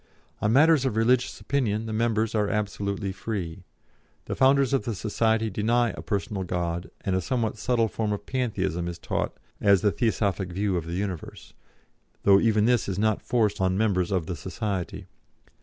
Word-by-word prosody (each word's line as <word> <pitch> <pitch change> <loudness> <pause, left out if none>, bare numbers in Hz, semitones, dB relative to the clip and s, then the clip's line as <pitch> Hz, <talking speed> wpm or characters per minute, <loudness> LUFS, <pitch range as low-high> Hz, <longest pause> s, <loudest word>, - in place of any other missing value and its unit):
On 105 - +2
matters 150 +3 +5
of 130 -5 -1
religious 120 +3 +2
opinion 115 -6 -1
the 110 - -4
members 110 -1 +1
are 105 -2 +1
absolutely 100 -1 -2
free. 95 -3 -5 0.6
The - - -3
founders 135 0 +4
of 135 - +2
the 115 -1 -3
society 110 +1 0
deny 115 +3 +1
a - - -8
personal 100 0 -2
God, 85 -1 -3
and 95 - -1
a 95 - +1
somewhat 115 -3 -1
subtle 120 -2 +2
form 110 0 -2
of 105 0 -4
Pantheism 95 -9 -1
is 85 -1 -5
taught - - -3 0.2
as 100 -3 +4
the 105 - +3
Theosophic 100 -2 0
view 100 0 0
of 85 -2 -2
the 85 - -4
universe, 95 -3 -5 0.7
though 100 -1 +6
even 110 -1 +3
this 120 -3 +2
is 95 - -3
not 110 0 +1
forced 110 -5 +1
on 95 0 +2
members 95 -5 +1
of 90 -5 0
the 90 - -4
society. 95 +1 -4
105 Hz, 175 wpm, -26 LUFS, 95-115 Hz, 0.7 s, though